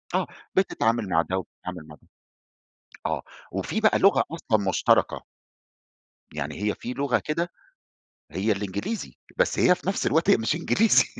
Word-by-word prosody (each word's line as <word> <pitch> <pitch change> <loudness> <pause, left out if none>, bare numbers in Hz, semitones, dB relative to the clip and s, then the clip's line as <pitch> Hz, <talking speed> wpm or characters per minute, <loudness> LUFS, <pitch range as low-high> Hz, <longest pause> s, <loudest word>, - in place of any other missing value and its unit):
آه - - +1 0.3
بتتعامل 115 - +1
مع 80 -2 +4
ده 90 +3 -2
وبتتعامل 90 -3 -7
مع 75 - -11
ده - - -26 1.0
آه - - -1 0.3
وفي 95 - -2
بقى 220 - +4
لغة 195 - +5
أصلًا 110 -12 0
مشتركة. - - +2 1.1
يعني 75 +4 -4
هي 105 0 +1
في 125 - -6
لغة 140 -1 +1
كده، 170 +3 -1 0.8
هي 100 +4 0
الإنجليزي، 100 - -3 0.2
بس - - +2
هي 180 - +6
في 180 - -12
نفس 195 - 0
الوقت 160 +2 +2
هي - - +7
مش 115 +6 0
إنجليزي، 205 +6 +4
115 Hz, 150 wpm, -26 LUFS, -, 1.1 s, هي